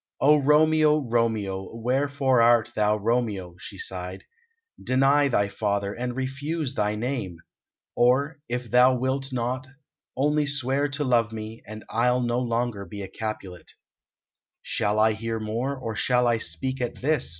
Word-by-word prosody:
"O 150 Hz, +3 st, +6 dB
Romeo, 150 Hz, +1 st, +4 dB
Romeo! 115 Hz, -7 st, -1 dB
Wherefore 130 Hz, +2 st, +1 dB
art 115 Hz, -1 st, +4 dB
thou 105 Hz, 0 st, +2 dB
Romeo?" 105 Hz, -5 st, -1 dB
she 100 Hz, -, -9 dB
sighed. 90 Hz, 0 st, -5 dB, 0.6 s
"Deny 135 Hz, +3 st, +3 dB
thy 100 Hz, -6 st, +1 dB
father, 100 Hz, 0 st, -2 dB
and 125 Hz, +1 st, -4 dB
refuse 135 Hz, +3 st, -3 dB
thy 105 Hz, -3 st, 0 dB
name. 110 Hz, -6 st, -3 dB, 0.6 s
Or, 140 Hz, +6 st, +2 dB
if 125 Hz, -1 st, -4 dB
thou 125 Hz, +1 st, +6 dB
wilt 135 Hz, +2 st, -2 dB
not, 130 Hz, +2 st, -2 dB, 0.5 s
only 150 Hz, +2 st, +2 dB
swear 140 Hz, 0 st, 0 dB
to 145 Hz, +1 st, -2 dB
love 120 Hz, -4 st, +2 dB
me, 110 Hz, 0 st, -7 dB
and 110 Hz, 0 st, -8 dB
I'll 125 Hz, +2 st, +1 dB
no 120 Hz, 0 st, 0 dB
longer 120 Hz, -3 st, -1 dB
be 100 Hz, 0 st, -8 dB
a -, -, -6 dB
Capulet." 95 Hz, -3 st, -7 dB, 0.9 s
"Shall 105 Hz, +1 st, -1 dB
I 110 Hz, +1 st, +4 dB
hear 115 Hz, +1 st, -3 dB
more, 115 Hz, +6 st, -2 dB
or 115 Hz, -4 st, -5 dB
shall 125 Hz, +4 st, +2 dB
I 120 Hz, -1 st, +2 dB
speak 125 Hz, +11 st, -3 dB
at 120 Hz, -1 st, -2 dB
this?" 150 Hz, 0 st, +1 dB
120 Hz, 150 wpm, -25 LUFS, 110-135 Hz, 0.9 s, O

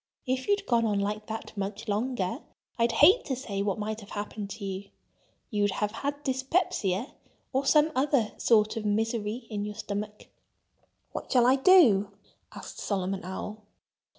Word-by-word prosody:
If 260 Hz, 0 st, -1 dB
you'd 405 Hz, 0 st, +1 dB
gone 235 Hz, -2 st, +2 dB
on 205 Hz, -2 st, +1 dB
like 210 Hz, +1 st, -2 dB
that 220 Hz, 0 st, -6 dB
much 200 Hz, +2 st, -4 dB
longer 215 Hz, 0 st, -1 dB, 0.4 s
I'd 235 Hz, 0 st, +3 dB
hate 370 Hz, -, +6 dB
to 265 Hz, -, -1 dB
say 210 Hz, -6 st, -4 dB
what 200 Hz, 0 st, 0 dB
might 215 Hz, +1 st, -3 dB
have 205 Hz, -2 st, -12 dB
happened 205 Hz, 0 st, -5 dB
to 200 Hz, +1 st, -6 dB
you. 195 Hz, +1 st, -5 dB, 0.6 s
You'd 205 Hz, -2 st, +1 dB
have 210 Hz, -1 st, -1 dB
had 285 Hz, +5 st, -4 dB
dyspepsia, 260 Hz, -, 0 dB, 0.4 s
or 270 Hz, +1 st, 0 dB
some 305 Hz, +2 st, +5 dB
other 265 Hz, -5 st, +2 dB
sort 215 Hz, -1 st, +3 dB
of 220 Hz, -, -3 dB
misery 220 Hz, +2 st, -1 dB
in 205 Hz, -1 st, -2 dB
your 210 Hz, 0 st, -5 dB
stomach." 210 Hz, 0 st, -5 dB, 0.9 s
"What -, -, -6 dB
shall 245 Hz, -2 st, +5 dB
I 255 Hz, +2 st, +6 dB
do?" 265 Hz, -, +6 dB, 0.4 s
asked -, -, -9 dB
Solomon 195 Hz, -1 st, -2 dB
Owl. 210 Hz, +4 st, -6 dB
215 Hz, 160 wpm, -28 LUFS, 205-260 Hz, 0.9 s, hate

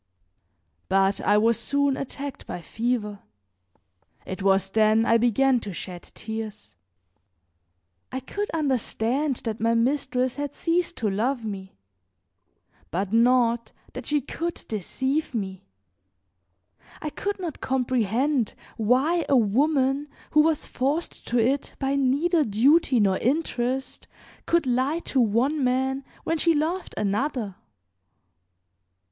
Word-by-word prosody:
But 195 Hz, +1 st, +2 dB
I 210 Hz, -, +3 dB
was 230 Hz, +2 st, +3 dB
soon 280 Hz, +3 st, +1 dB
attacked 275 Hz, +1 st, -6 dB
by -, -, -5 dB
fever. 210 Hz, +3 st, -2 dB, 1.1 s
It 190 Hz, 0 st, -6 dB
was 195 Hz, 0 st, +2 dB
then 220 Hz, +1 st, +4 dB
I 230 Hz, 0 st, +4 dB
began 250 Hz, +2 st, +3 dB
to 205 Hz, -4 st, -6 dB
shed 175 Hz, 0 st, -6 dB
tears. 220 Hz, -, -6 dB, 1.4 s
I 260 Hz, -, -2 dB
could 410 Hz, +11 st, -4 dB
understand 270 Hz, -2 st, 0 dB
that 220 Hz, -1 st, -3 dB
my 230 Hz, +1 st, +2 dB
mistress 255 Hz, +1 st, 0 dB
had 290 Hz, -1 st, -4 dB
ceased 345 Hz, +1 st, 0 dB
to 220 Hz, -, 0 dB
love 235 Hz, +4 st, -1 dB
me, 190 Hz, -, -6 dB, 1.1 s
but 190 Hz, +5 st, -2 dB
not 235 Hz, 0 st, +3 dB, 0.2 s
that 255 Hz, -, -7 dB
she 295 Hz, -1 st, +2 dB
could 335 Hz, +6 st, -5 dB
deceive 260 Hz, -, -2 dB
me. 190 Hz, -, -4 dB, 1.3 s
I 305 Hz, -, -4 dB
could 405 Hz, +5 st, -3 dB
not 340 Hz, -6 st, -5 dB
comprehend 255 Hz, 0 st, 0 dB, 0.2 s
why 265 Hz, +10 st, +2 dB
a 275 Hz, -, +5 dB
woman 270 Hz, +5 st, +2 dB, 0.2 s
who 305 Hz, -, +6 dB
was 315 Hz, -1 st, +1 dB
forced 285 Hz, +6 st, -2 dB
to 245 Hz, -, 0 dB
it 260 Hz, +5 st, +1 dB
by 270 Hz, 0 st, 0 dB
neither 290 Hz, +5 st, +2 dB
duty 260 Hz, +5 st, +3 dB
nor 195 Hz, -3 st, +3 dB
interest 260 Hz, -2 st, -1 dB, 0.4 s
could 340 Hz, -2 st, +2 dB
lie 260 Hz, +5 st, +1 dB, 0.2 s
to 265 Hz, -, +4 dB
one 250 Hz, +7 st, +2 dB
man 265 Hz, +2 st, 0 dB, 0.2 s
when 330 Hz, 0 st, -1 dB
she 335 Hz, 0 st, +3 dB
loved 330 Hz, +5 st, -2 dB
another. 215 Hz, +1 st, -1 dB
255 Hz, 120 wpm, -25 LUFS, 220-285 Hz, 1.4 s, who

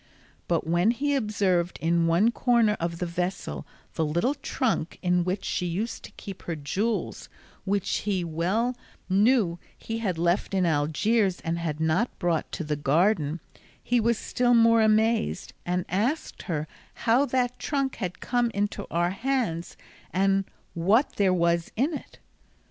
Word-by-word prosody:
But 170 Hz, -2 st, 0 dB
when 175 Hz, +5 st, +2 dB
he 285 Hz, +5 st, +1 dB
observed 200 Hz, -8 st, +1 dB
in 165 Hz, 0 st, +2 dB
one 180 Hz, +8 st, +4 dB
corner 235 Hz, -3 st, +3 dB
of 170 Hz, 0 st, -2 dB
the 180 Hz, -, -2 dB
vessel 170 Hz, -, -3 dB, 0.3 s
the 160 Hz, -, 0 dB
little 170 Hz, -, +1 dB
trunk 250 Hz, -, -2 dB
in 180 Hz, -1 st, +2 dB
which 185 Hz, +2 st, -2 dB
she 180 Hz, -, -1 dB
used 210 Hz, +7 st, -3 dB
to -, -, -12 dB
keep 195 Hz, -3 st, -9 dB
her 170 Hz, -, -4 dB
jewels, 195 Hz, +10 st, -2 dB, 0.4 s
which 200 Hz, -1 st, 0 dB
he 195 Hz, -3 st, -1 dB
well 185 Hz, +10 st, 0 dB, 0.3 s
knew 195 Hz, -2 st, +3 dB, 0.2 s
he 225 Hz, 0 st, -4 dB
had 190 Hz, -7 st, -1 dB
left 175 Hz, +4 st, 0 dB
in 185 Hz, -2 st, +2 dB
Algiers 175 Hz, +6 st, +1 dB
and 165 Hz, +1 st, -2 dB
had 155 Hz, -3 st, -3 dB
not 160 Hz, +9 st, 0 dB
brought 170 Hz, -3 st, -1 dB
to -, -, -3 dB
the 150 Hz, -1 st, -1 dB
garden, 155 Hz, +2 st, +1 dB, 0.4 s
he 245 Hz, 0 st, +2 dB
was 230 Hz, 0 st, +2 dB
still 245 Hz, +1 st, +1 dB
more 230 Hz, 0 st, +5 dB
amazed, 220 Hz, +1 st, +2 dB
and 180 Hz, 0 st, 0 dB
asked 230 Hz, -, -1 dB
her 155 Hz, -2 st, -1 dB, 0.4 s
how 240 Hz, +4 st, +5 dB
that 250 Hz, 0 st, 0 dB
trunk 275 Hz, -2 st, -1 dB
had 180 Hz, -5 st, -5 dB
come 245 Hz, -1 st, +1 dB
into 205 Hz, 0 st, -2 dB
our 175 Hz, +1 st, +1 dB
hands, 225 Hz, -7 st, -2 dB, 0.3 s
and 195 Hz, +1 st, +2 dB, 0.3 s
what 200 Hz, -, +2 dB
there 195 Hz, -2 st, +3 dB
was 170 Hz, -1 st, +1 dB
in 275 Hz, +9 st, +1 dB
it. 290 Hz, -, -8 dB
190 Hz, 155 wpm, -26 LUFS, 170-230 Hz, 0.4 s, more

